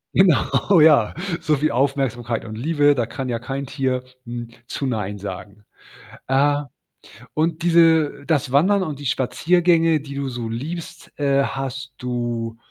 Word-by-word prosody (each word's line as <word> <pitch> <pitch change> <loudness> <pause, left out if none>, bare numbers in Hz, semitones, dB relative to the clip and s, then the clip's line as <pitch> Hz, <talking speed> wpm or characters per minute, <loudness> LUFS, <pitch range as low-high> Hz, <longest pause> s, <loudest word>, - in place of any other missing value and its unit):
Genau, 175 -1 +4
ja. 145 -9 +5 0.3
So 155 - +1
viel 150 0 0
Aufmerksamkeit 125 -3 -1
und 110 -1 -8
Liebe, 145 +1 +3
da 120 - 0
kann 130 +3 -5
ja 115 -2 -2
kein 135 +3 -4
n - - -5
Tier 130 -1 -2 0.6
zu 140 - -4
„Nein“ 105 -5 -2
sagen. 100 +1 -8 0.6
Äh. 140 +2 +3 0.8
Und 160 +1 0
diese 165 -4 +3
das 140 -5 0
Wandern 190 +8 +4
und 150 -6 -4
die 145 - -9
Spaziergänge, 165 +5 +2
die 140 -1 -9
du 140 -1 -3
so 120 -2 -5
liebst, 165 +7 -6
äh, 140 -1 +3
hast 135 0 -5
du 120 -2 -3
140 Hz, 145 wpm, -21 LUFS, 120-155 Hz, 0.8 s, ja